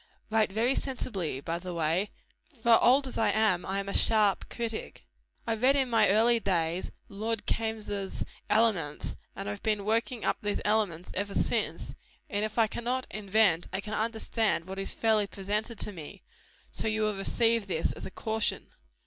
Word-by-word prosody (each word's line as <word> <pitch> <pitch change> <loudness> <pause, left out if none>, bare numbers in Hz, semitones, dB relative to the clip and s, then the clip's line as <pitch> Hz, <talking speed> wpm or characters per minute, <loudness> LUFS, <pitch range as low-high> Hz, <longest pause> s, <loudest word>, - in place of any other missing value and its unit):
Write 220 -2 +3
very 230 +6 +2
sensibly, 205 - -3
by 165 +3 -3
the 180 -1 -6
way; 165 +5 +1 0.5
for 235 -1 +6
old 270 +3 +5
as 260 - -4
I 225 - +3
am, 215 -5 +2
I 195 +1 -2
am 200 0 -2
a 200 - -3
sharp 215 -3 +3
critic. 230 -2 -5 0.4
I 230 - +1
read 255 +5 +3
in 265 -3 +2
my 220 -3 +5
early 230 +4 +5
days 175 -3 0 0.2
Lord 215 +1 -3
Kaimes' 215 -3 -2 0.3
Elements, 195 -10 +1 0.2
and 100 +1 -5
I - - -1
have 105 - -7
been 210 -2 0
working 230 +2 0
up - - +1
these 205 -1 -1
elements 205 -5 0
ever 200 +1 -3
since; - - -1 0.4
and 205 0 0
if 215 +1 -3
I 225 - +6
cannot 245 +4 -2
invent, 200 -4 +2
I 190 - -1
can 210 +2 -6
understand 220 -3 0
what 190 +1 -6
is 195 - 0
fairly 220 -2 +2
presented 210 +4 -2
to - - 0
me: 160 -6 -9 0.5
so - - -3
you 215 0 +1
will 215 -1 +1
receive 225 +2 +1
this 165 -4 0
as - - -7
a - - -7
caution. 220 +3 -2
215 Hz, 180 wpm, -29 LUFS, 195-225 Hz, 0.5 s, for